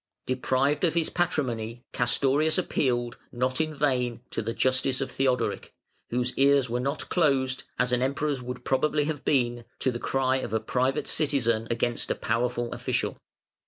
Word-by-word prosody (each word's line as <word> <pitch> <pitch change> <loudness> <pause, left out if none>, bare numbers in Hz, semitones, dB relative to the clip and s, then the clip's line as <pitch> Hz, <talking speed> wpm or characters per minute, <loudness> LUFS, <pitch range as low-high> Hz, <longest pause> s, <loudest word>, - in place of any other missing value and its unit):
Deprived 130 +3 +1
of 170 -2 +2
his 165 -2 +2
patrimony, 120 -9 -1
Castorius 140 +6 +2
appealed, 120 -8 0
not 130 +3 0
in 155 -1 -2
vain, 125 -5 0
to - - -2
the 115 +1 -2
justice 130 0 +2
of 135 - -3
Theodoric, 130 -3 -1 0.3
whose 125 +1 0
ears 140 -3 +4
were 120 - 0
not 140 +4 -2
closed, 135 -6 +1
as 125 0 +1
an 125 0 +2
Emperor's 140 +1 0
would 125 0 -7
probably 150 +3 +2
have 150 -1 -3
been, 120 -3 +1
to 130 - +1
the 120 - -4
cry 130 0 +1
of 130 - -4
a 110 - +2
private 130 +5 0
citizen 120 -7 +1
against 120 0 -1
a - - +1
powerful 120 +1 -1
official. - - -2
130 Hz, 160 wpm, -27 LUFS, 120-140 Hz, 0.3 s, ears